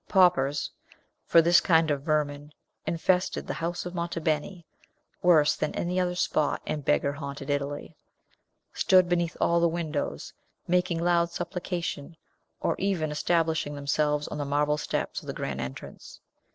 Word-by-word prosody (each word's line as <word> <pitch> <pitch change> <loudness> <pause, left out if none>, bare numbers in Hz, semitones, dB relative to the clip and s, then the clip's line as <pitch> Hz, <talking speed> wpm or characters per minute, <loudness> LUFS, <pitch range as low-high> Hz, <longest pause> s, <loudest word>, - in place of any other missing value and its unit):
Paupers 170 -7 +3 0.6
for 165 - +6
this 170 +1 +6
kind 160 -3 +3
of 140 -1 -1
vermin 150 -1 -1 0.3
infested 180 +2 +1
the - - -3
house 170 +1 -3
of 180 - -5
Monte 170 -1 -3
Beni 160 +3 -2 0.6
worse 155 -4 +5
than - - -2
any 180 +1 -1
other 180 -1 0
spot 155 -4 +1
in 155 -1 -3
beggar 140 0 +1
haunted 140 -1 -5
Italy 145 +2 -3 0.8
stood 185 -1 +4
beneath 175 -1 0
all 170 0 +3
the 170 0 +3
windows, 160 -3 -3 0.3
making 180 -1 +1
loud 170 -1 +3
supplication, 175 -3 -4 0.4
or - - +1
even 180 -6 0
establishing 160 -1 0
themselves 150 +1 0
on 150 - -5
the - - -1
marble 150 +1 +1
steps - - -3
of - - -14
the - - -3
grand - - -4
entrance. 65 0 -8
160 Hz, 150 wpm, -27 LUFS, 145-175 Hz, 0.8 s, for